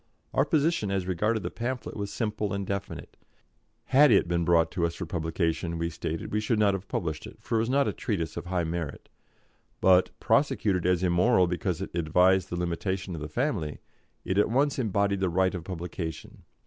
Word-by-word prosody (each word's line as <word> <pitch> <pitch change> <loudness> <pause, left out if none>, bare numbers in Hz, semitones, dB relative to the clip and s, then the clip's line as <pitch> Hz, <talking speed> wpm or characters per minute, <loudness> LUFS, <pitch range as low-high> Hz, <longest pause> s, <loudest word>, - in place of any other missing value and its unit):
Our - - +3
position 155 - +1
as 95 -2 -1
regarded 105 +5 0
the - - -3
pamphlet 120 0 -4
was 100 -1 -4
simple 105 -3 -2
and 100 0 -2
definite; 100 0 -5 0.7
had 145 +2 +5
it 100 -6 +4
been 85 0 0
brought 85 -1 +3
to 85 - -2
us 85 - -7
for 90 - -5
publication, 85 0 -2
we 85 0 -2
stated, 80 0 -4
we 105 - +1
should 110 +1 0
not 105 -2 +3
have 95 0 -5
published 80 -3 -3
it, - - -12
for 115 - -2
it - - +3
was 115 +2 0
not 140 +1 +3
a - - -1
treatise 85 - -3
of 85 0 -6
high 90 -1 0
merit; 80 -2 -4 0.7
but, 95 -1 +5
prosecuted 90 -4 +2
as 90 0 +2
immoral 90 +3 +4
because 85 -2 -2
it - - -8
advised 90 +3 +3
the 85 - -3
limitation 90 +2 -2
of 80 - -6
the 75 - -4
family, 100 - -1 0.5
it 95 +2 +1
at 105 - +3
once 140 +4 +1
embodied 100 -3 +1
the 95 -1 +1
right 95 +2 +2
of 90 -3 -5
publication. 85 -2 -6
95 Hz, 200 wpm, -28 LUFS, 85-105 Hz, 0.7 s, had